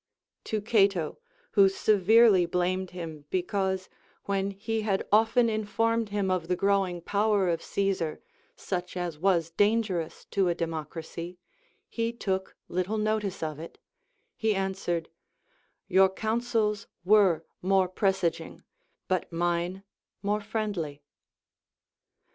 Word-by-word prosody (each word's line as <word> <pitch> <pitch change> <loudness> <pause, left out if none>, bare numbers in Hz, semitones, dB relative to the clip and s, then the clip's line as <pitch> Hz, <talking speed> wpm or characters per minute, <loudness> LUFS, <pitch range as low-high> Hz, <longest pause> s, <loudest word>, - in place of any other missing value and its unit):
To 215 -1 -1
Cato, 195 - +2 0.4
Λνΐιο 200 -2 +7
severely 205 0 +5
blamed 180 +1 0
him 160 -5 -7
because, 190 0 -1 0.4
when 195 0 -1
he 220 +3 -3
had 200 -3 -1
often 225 +3 +4
informed 225 +1 0
him 200 -2 0
of 180 -3 -1
the 180 - +1
growing 195 -2 +1
power 205 +1 +2
of 165 -1 0
Caesar, 195 -6 -1 0.4
such 180 -1 -4
as 175 -4 -3
was 170 -2 +2
dangerous 205 -3 0
to 195 -2 +2
a 170 - 0
democracy, 165 +2 -5 0.5
he 230 0 -2
took 190 -5 -3
little 185 +5 -1
notice 210 -4 -1
of 155 -2 -3
it, 165 - -9 0.6
he 220 -2 +1
answered, 190 -4 -2 0.8
Your 190 0 +5
counsels 220 0 -1 0.2
were 190 -5 +4 0.2
more 190 0 +3
presaging, 190 -2 -1 0.4
but 185 -1 -1
mine 175 +2 -1 0.4
more 205 +1 0
friendly. 200 -9 -3
190 Hz, 115 wpm, -28 LUFS, 175-210 Hz, 0.8 s, Λνΐιο